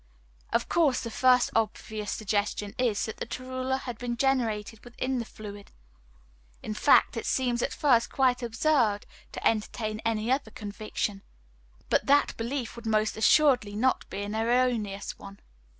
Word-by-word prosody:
Of - - +1
course 305 -7 +2
the 230 - -5
first 250 +1 +4
obvious 215 -1 -2
suggestion 205 -1 -2
is, 235 -5 +1
that 220 - -6
the - - -4
torula 255 +2 -3
has 245 -3 -6
been 240 0 -4
generated 225 -5 0
within 255 +2 -3
the 230 - -3
fluid. 205 -2 -10 0.9
In 215 - -3
fact, - - +4
it - - -4
seems 245 -2 +1
at - - -1
first 245 -6 +3
quite 255 -2 +2
absurd 230 -3 +1 0.3
to - - 0
entertain 215 0 -2
any 225 +1 0
other 265 -3 0
conviction; 205 -1 -4 0.7
but - - +1
that 285 +1 +4
belief 235 0 -4
would 235 -1 -8
most 215 -1 +1
assuredly 225 -3 +3 0.3
be 200 - -4
an 205 +1 -4
erroneous 225 -3 0
one. 200 0 -11
230 Hz, 150 wpm, -28 LUFS, 215-255 Hz, 0.9 s, first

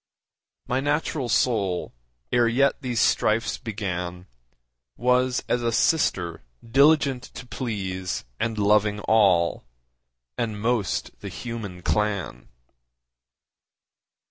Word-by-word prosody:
My 125 - 0
natural 145 -2 -1
soul, 100 -8 +1 0.4
ere 120 -1 +4
yet 135 +4 +2
these 125 -3 -2
strifes 110 +2 +2
began, 90 -6 -4 0.7
Was 125 +1 +2
as 120 - +1
a 120 -1 0
sister 95 - +1 0.3
diligent 140 +1 +4
to 125 - -8
please 95 -8 -4
And 115 -1 -1
loving 105 0 +3
all, 95 -7 +3 0.8
and 110 -3 -2
most 115 -2 -1
the - - -7
human 105 -7 -7
clan. 100 - -1
110 Hz, 95 wpm, -25 LUFS, 95-125 Hz, 0.8 s, ere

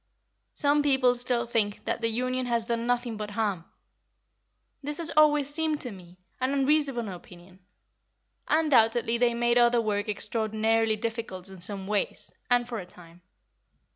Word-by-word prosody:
Some 290 0 +2
people 265 -3 +3
still 245 -1 0
think 220 -4 -1
that - - -2
the 230 - +1
Union 255 +2 -2
has 235 -2 0
done 235 0 -2
nothing 245 -2 -1
but 210 0 -5
harm. 205 -5 -2 1.2
This 295 +1 -4
has 335 -1 0
always 295 -2 +4
seemed 310 +1 0
to 250 - +4
me 180 -2 -14 0.2
an 260 +2 0
unreasonable 275 -5 +1
opinion. 180 +1 -14 0.9
Undoubtedly 235 -7 +3
they 240 -1 +2
made 240 0 +2
other 240 0 +4
work 210 -2 -1
extraordinarily 220 +1 0
difficult 215 -4 -5
in 190 -2 -12
some 195 +1 -4
ways, 205 0 -2 0.2
and 245 -1 +2
for 235 -2 -4
a 185 - -7
time. 175 -1 -15
235 Hz, 150 wpm, -27 LUFS, 210-255 Hz, 1.2 s, always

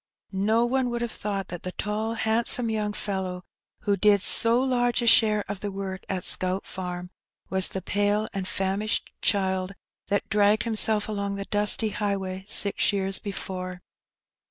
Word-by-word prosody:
No 215 +4 +2
one 255 +1 +1
would 240 0 -2
have 235 - -3
thought 200 -2 -4
that 175 - -6
the 185 - -6
tall, 215 +2 -2
handsome 230 +1 +2
young 210 -1 -1
fellow 190 -3 -3 0.4
who 205 - +1
did 205 0 +4
so 230 +1 +4
large 245 -2 +1
a - - 0
share 215 -2 +5
of 200 -1 -5
the 205 - -4
work 190 -1 -5
at 185 -2 -2
Scout 185 +1 0
Farm, 180 -1 -6 0.4
was 190 -1 +3
the 190 - -5
pale 205 +2 +1
and 195 -2 -3
famished 195 +3 -1
child 190 -1 0 0.3
that 205 - 0
dragged 210 0 +3
himself 220 -2 +3
along 200 -2 -2
the 200 0 -5
dusty 210 +2 +1
highway 195 -2 -3
six 200 -1 +3
years 195 -1 0
before. 185 -2 -5
205 Hz, 160 wpm, -26 LUFS, 190-215 Hz, 0.4 s, share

